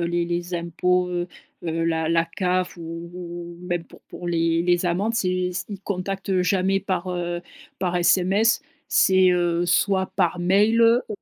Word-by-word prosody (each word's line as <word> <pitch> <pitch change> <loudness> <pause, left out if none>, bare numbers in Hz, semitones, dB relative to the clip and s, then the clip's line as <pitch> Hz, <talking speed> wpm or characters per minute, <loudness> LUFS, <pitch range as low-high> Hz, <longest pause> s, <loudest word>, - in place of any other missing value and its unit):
heu, - - 0
les 170 0 0
les 175 +1 -3
impôts, 180 +1 0
heu 175 0 -2 0.4
heu, 165 0 -1
la 160 -1 0
la 165 0 +3
CAF 180 +1 -1
ou 165 0 -7
ou 175 -1 -8
même 175 -2 -2
pour - - -17
pour 175 - -8
les 165 0 +1
les 175 0 +2
amendes, 195 +7 0
c'est 185 -3 0
c 180 - -3
ils 200 -3 -7
contactent 195 -1 -2
jamais 190 +1 +1
par, 185 -2 -2
heu, 175 -1 -3 0.4
par 180 -2 -1
SMS. 190 +5 +3 0.3
C'est, 185 -1 +5
heu, 175 -1 +1
soit 190 +2 +2
par 175 0 +1
mail, 205 +6 +3
heu, 230 +2 +4
180 Hz, 170 wpm, -23 LUFS, 170-190 Hz, 0.4 s, C'est